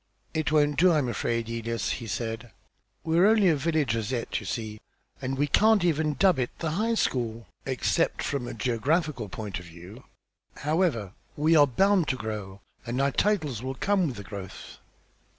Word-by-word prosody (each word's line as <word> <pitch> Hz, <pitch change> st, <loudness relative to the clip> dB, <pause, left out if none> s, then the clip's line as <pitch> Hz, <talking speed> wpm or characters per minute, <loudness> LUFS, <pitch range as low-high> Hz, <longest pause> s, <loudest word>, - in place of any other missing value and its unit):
"It 155 Hz, -2 st, 0 dB
won't 145 Hz, -2 st, +3 dB
do, 180 Hz, +1 st, +6 dB
I'm 150 Hz, -6 st, +2 dB
afraid, 115 Hz, -1 st, -1 dB
Elias," 115 Hz, 0 st, -2 dB
he 115 Hz, -, -4 dB
said. 115 Hz, +3 st, -4 dB, 0.5 s
"We're 165 Hz, +4 st, +4 dB
only 215 Hz, -4 st, +5 dB
a 160 Hz, -, +4 dB
village 150 Hz, -5 st, 0 dB
as 110 Hz, +1 st, -2 dB
yet, 120 Hz, -3 st, -2 dB
you -, -, -9 dB
see, 110 Hz, -2 st, -4 dB, 0.4 s
and 135 Hz, 0 st, -2 dB
we 145 Hz, -, +2 dB
can't 215 Hz, +6 st, +4 dB
even 155 Hz, -3 st, +1 dB
dub 185 Hz, 0 st, +3 dB
it 125 Hz, -, 0 dB
the 160 Hz, -2 st, -2 dB
High 220 Hz, +7 st, 0 dB
School, 115 Hz, -, -1 dB, 0.2 s
except 130 Hz, -2 st, 0 dB
from 135 Hz, -4 st, -2 dB
a 120 Hz, -, -6 dB
geographical 125 Hz, -, 0 dB
point 100 Hz, -1 st, -5 dB
of 90 Hz, -, -11 dB
view. 90 Hz, +8 st, -12 dB, 0.5 s
However, 150 Hz, -, 0 dB, 0.2 s
we 155 Hz, +3 st, +3 dB
are 145 Hz, -2 st, +7 dB
bound 190 Hz, -, +3 dB
to -, -, +1 dB
grow, 105 Hz, -4 st, -6 dB, 0.2 s
and 120 Hz, +2 st, -3 dB
our 140 Hz, 0 st, +2 dB
titles 155 Hz, -, 0 dB
will 130 Hz, +1 st, -4 dB
come 195 Hz, +3 st, +1 dB
with 130 Hz, -, -4 dB
the 100 Hz, -, -8 dB
growth." 95 Hz, -1 st, -9 dB
130 Hz, 180 wpm, -27 LUFS, 115-160 Hz, 0.5 s, are